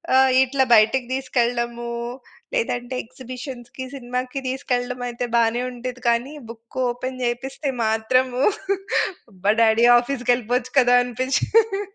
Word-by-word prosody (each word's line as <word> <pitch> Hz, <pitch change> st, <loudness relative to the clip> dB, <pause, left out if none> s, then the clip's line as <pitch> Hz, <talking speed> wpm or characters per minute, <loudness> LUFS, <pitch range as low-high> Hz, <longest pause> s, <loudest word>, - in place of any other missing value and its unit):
ఆహ్, 265 Hz, 0 st, +5 dB
ఇట్లా 265 Hz, +1 st, +1 dB
బయటికి 240 Hz, +4 st, +3 dB
తీసుకెళ్ళడము, 240 Hz, -2 st, -1 dB, 0.6 s
లేదంటే 255 Hz, -, -2 dB
ఎక్సిబిషన్‌కి, 255 Hz, 0 st, -9 dB
సినిమాకి 250 Hz, +1 st, -4 dB
తీసుకెళ్ళడమయితే 245 Hz, -1 st, -2 dB
బానే 235 Hz, +1 st, +2 dB
ఉండేది 250 Hz, +1 st, -7 dB
కానీ 240 Hz, +5 st, +1 dB, 0.2 s
బుక్ 230 Hz, +2 st, -12 dB
ఓపెన్ 255 Hz, +1 st, -5 dB
చేయిపిస్తే 265 Hz, +4 st, -2 dB, 0.2 s
మాత్రము 250 Hz, +4 st, +1 dB, 0.9 s
అబ్బా! 195 Hz, +2 st, 0 dB
డ్యాడీ 225 Hz, +1 st, +5 dB
ఆఫీస్‌కేళ్ళిపోవచ్చు 245 Hz, -1 st, -1 dB
కదా! 245 Hz, -1 st, +5 dB
అనిపించేది. 390 Hz, -, +1 dB
245 Hz, 100 wpm, -22 LUFS, 240-260 Hz, 0.9 s, ఆహ్